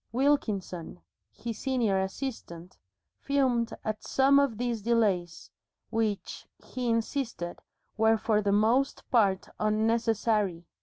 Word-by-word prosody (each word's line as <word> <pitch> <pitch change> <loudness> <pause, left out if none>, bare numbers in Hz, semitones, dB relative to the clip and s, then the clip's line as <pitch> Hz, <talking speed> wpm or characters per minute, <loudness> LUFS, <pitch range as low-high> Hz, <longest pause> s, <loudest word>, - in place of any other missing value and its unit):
Wilkinson, 215 - -1 0.3
his 230 -2 -6
senior 240 -8 +1
assistant, 190 -4 -6 0.4
fumed 255 -5 +1
at 215 0 -3
some 275 +1 +4
of 275 -6 +1
these 240 -2 -2
delays, 200 -7 0 0.4
which, 220 -3 -2 0.2
he 250 -2 -3
insisted, 230 -6 -2 0.4
were 220 0 +4
for 215 -1 +1
the 200 -1 0
most 230 +7 +2
part 200 -6 +3
unnecessary. 215 -4 +1
225 Hz, 105 wpm, -28 LUFS, 200-245 Hz, 0.4 s, some